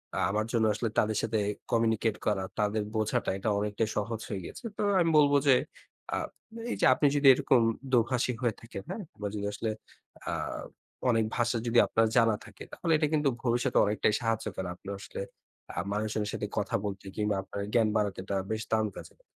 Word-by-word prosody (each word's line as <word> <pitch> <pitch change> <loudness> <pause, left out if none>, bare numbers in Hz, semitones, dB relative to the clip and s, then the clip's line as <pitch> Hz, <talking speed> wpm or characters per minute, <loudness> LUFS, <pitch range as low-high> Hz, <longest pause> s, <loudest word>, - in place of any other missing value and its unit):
আ - - 0
আমার 105 +2 0
জন্য 115 -2 +3
আসলে 110 +2 -1
তাদের 110 0 +1
সাথে 110 -1 0 0.3
কমিউনিকেট 115 -1 +2
করা 100 -3 +1 0.2
তাঁদের 105 0 +1
বোঝাটা 110 -1 0
এটা 100 - -1
অনেকটাই 105 +2 -1
সহজ 110 +1 -2
হয়ে 100 -3 -3
গেছে। - - -9
তো - - -2 0.2
আমি 170 -2 +3
বলব 145 -1 +5
যে 135 - +8 0.6
আ - - 0 0.5
এইযে - - +1
আপনি 145 - +3
যদি 145 -1 +4
এরকম 125 -1 +3 0.3
দোভাষী 125 +1 +2
হয়ে 120 -4 +1
থাকেন 115 -4 -8
হ্যাঁ? 200 +3 -4 0.2
বা 105 - -1
যদি 100 -1 -3
আসলে 110 +2 -2 0.6
আ - - 0 0.8
অনেক 115 -2 +3
ভাষা 120 0 +1
যদি 120 +1 +2
আপনার 115 0 +3
জানা 115 -2 +5
থাকে - - -11
তাহলে 165 - -2
এটা 150 0 +2
কিন্তু 150 -2 +3
ভবিষ্যতে 120 -1 +1
অনেকটাই 105 +1 +1
সাহায্য 115 -1 0
করে। 95 - -3
আপনি 95 - -17
আসলে 100 - -7 0.5
আ - - -11
মানুষজনের 105 0 -1
সাথে 105 - -3
কথা 105 - 0
বলতে 100 -1 -5
কিংবা 105 -1 0
আপনার 100 +1 -6
জ্ঞান 115 -3 +4
বাড়াতে 105 -3 -1
এটা 100 - -2 0.2
বেশ 110 0 -1
দারুণ 110 -1 +2
কাজে - - -10
দেয়। - - -27
110 Hz, 190 wpm, -29 LUFS, 105-120 Hz, 0.8 s, যে